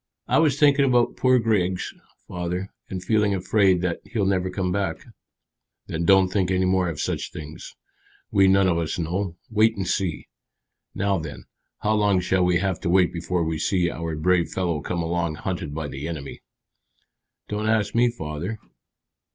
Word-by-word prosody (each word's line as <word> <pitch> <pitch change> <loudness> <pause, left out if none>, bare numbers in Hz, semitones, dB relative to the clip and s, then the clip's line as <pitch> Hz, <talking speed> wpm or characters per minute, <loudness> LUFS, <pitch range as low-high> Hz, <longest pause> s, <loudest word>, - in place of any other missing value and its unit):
"I - - +3
was 150 -4 +3
thinking 145 -1 +5
about 125 -3 +2
poor 130 0 +4
Griggs, 100 -6 0 0.3
father, 90 +2 -4 0.2
and 95 -1 -5
feeling 105 0 +2
afraid 95 -1 +2
that 90 -2 -1
he'll 110 -4 -2
never 95 -1 +1
come 90 0 -2
back." 95 -4 -2 0.8
"Then 80 +1 -3
don't 95 +1 +5
think 95 -1 0
any 95 0 +2
more 95 -1 +2
of 75 -3 -6
such - - -2
things. 80 +2 -9 0.6
We 95 -1 +5
none 95 0 +4
of 85 -2 +2
us 80 -2 -2
know. 90 +2 -2 0.2
Wait 110 0 +3
and 95 -2 -2
see. 95 -2 -2 0.7
Now 100 -2 +1
then, 80 -2 -7 0.4
how 105 - +2
long 105 -3 +3
shall 90 0 +1
we 90 -1 +3
have 95 -1 -1
to - - -2
wait 90 0 +3
before 85 0 -1
we 80 -1 -2
see 90 0 +1
our 85 -1 -4
brave 85 +2 +2
fellow 85 -5 -1
come 85 +3 -2
along 85 -1 -1
hunted 85 -4 -4
by 80 -2 -3
the 70 +2 -6
enemy?" 75 -4 -6 1.1
"Don't 105 +1 -2
ask 110 -2 +1
me, 120 +1 +4
father." 85 0 -5
90 Hz, 175 wpm, -24 LUFS, 85-100 Hz, 1.1 s, thinking